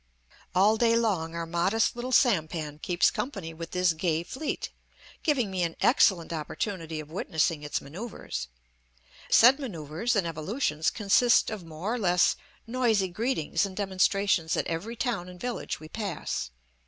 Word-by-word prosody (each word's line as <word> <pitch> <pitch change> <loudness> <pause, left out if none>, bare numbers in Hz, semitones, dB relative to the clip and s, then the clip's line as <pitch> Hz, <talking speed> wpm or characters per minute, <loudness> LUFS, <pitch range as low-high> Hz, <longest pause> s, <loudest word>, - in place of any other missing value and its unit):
All 205 +4 +5
day 230 0 +3
long 185 -8 0
our 170 0 -3
modest 185 +9 +1
little 245 +2 -4
sampan 160 - +2
keeps 175 +2 +2
company 195 - -4
with 165 +1 -7
this 180 -2 +2
gay 160 0 0
fleet, 265 - -4 0.5
giving 255 -10 +1
me 185 -1 -2
an 170 -1 -1
excellent 175 -9 +3
opportunity 165 +1 -4
of 155 0 -9
witnessing 160 -2 0
its 150 0 -3
manoeuvres. 165 - -6 0.8
Said 255 +5 +7
manoeuvres 180 - -2
and 200 -4 +2
evolutions 160 - -1
consist 220 +4 +3
of 215 -4 -5
more 165 +7 -4
or 245 - -2
less 180 -3 +3 0.3
noisy 225 -5 +1
greetings 215 - -1
and 195 -2 -4
demonstrations 195 -3 +1
at - - 0
every 195 +8 -4
town 220 -8 -2
and 180 0 -12
village 245 +2 -4
we 155 - -10
pass. 195 - -4
185 Hz, 150 wpm, -28 LUFS, 165-225 Hz, 0.8 s, Said